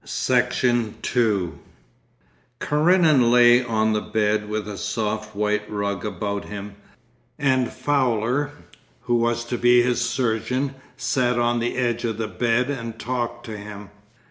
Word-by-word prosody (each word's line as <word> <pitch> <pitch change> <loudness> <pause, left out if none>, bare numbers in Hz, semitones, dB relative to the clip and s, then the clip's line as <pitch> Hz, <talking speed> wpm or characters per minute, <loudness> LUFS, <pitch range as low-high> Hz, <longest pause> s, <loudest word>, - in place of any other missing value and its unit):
Section 120 -3 +1
2 105 -8 0 1.0
Karenin 155 -4 +4
lay 120 +1 +6
on 110 -2 +1
the 105 - 0
bed 105 -1 0
with 105 0 -3
a 105 - -5
soft 110 0 -3
white 105 0 0
rug 100 -3 -3
about 100 -1 -3
him, 100 0 -7 0.6
and 130 -4 +1
Fowler, 130 -1 0 0.5
who 120 - -2
was 120 0 +1
to 120 0 -3
be 120 0 +5
his 125 0 0
surgeon 125 +3 -1 0.2
sat 125 -1 0
on 120 0 +1
the 120 +2 -2
edge 120 -2 0
of 115 -3 -2
the 110 -1 -2
bed 120 +4 0
and 115 -4 -5
talked 120 0 -3
to 110 - -6
him. 105 -1 -9
120 Hz, 140 wpm, -23 LUFS, 105-125 Hz, 1.0 s, lay